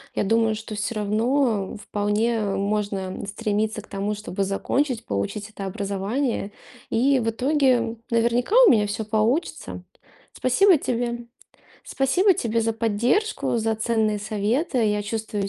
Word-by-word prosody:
Я - - +1
думаю, 225 +1 +2
что 215 0 -7
всё 210 +2 -3
равно 215 0 0
вполне 210 +3 0
можно 200 -1 -2
стремиться 215 +1 -2
к - - -19
тому, 200 +1 -3
чтобы 200 -2 -3
закончить, 245 +6 -1
получить 105 - -3
это 200 -2 -7
образование. 200 +4 -2 0.4
И 265 +3 +3
в 225 - 0
итоге, 250 -2 +1
наверняка, 240 - +1
у - - +8
меня 210 -2 +3
всё 210 +1 -3
получится. 220 +9 -1 0.5
Спасибо 360 +8 +4
тебе. 240 -2 -3 0.6
Спасибо 360 +9 +2
тебе 230 -7 -1
за 225 0 0
поддержку, 235 - 0
за 220 0 0
ценные 220 -1 0
советы. 220 +8 -1
Я 210 -1 +1
чувствую 210 -1 -3
220 Hz, 130 wpm, -24 LUFS, 205-240 Hz, 0.6 s, у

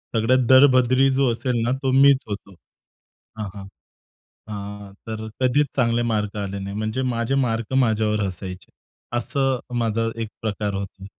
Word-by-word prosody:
सगळ्यात 125 +3 +3
दळभद्री 130 0 +6
जो 135 -2 +3
असेल 120 0 -1
ना, 120 - 0
तो 135 - +2
मीच 135 +1 +6
होतो 100 -2 -7 0.8
हां, 105 -2 -4
हां. 100 -1 -8 0.8
अ, 100 -1 -7
तर 110 0 -5
कधीच 130 +3 +3
चांगले 120 -2 +2
मार्क 105 -1 -2
आले 100 -1 -4
नाही. 100 +1 -6
म्हणजे 110 +4 -2
माझे 115 +3 -1
मार्क 115 +1 -3
माझ्यावर 110 -4 +2
हसायचे 90 -1 -7 0.5
असं 135 +1 0 0.2
माझा 115 0 0
एक 110 - -3
प्रकार 105 -2 -2
होता. 100 0 -6
115 Hz, 145 wpm, -23 LUFS, 105-130 Hz, 0.8 s, दळभद्री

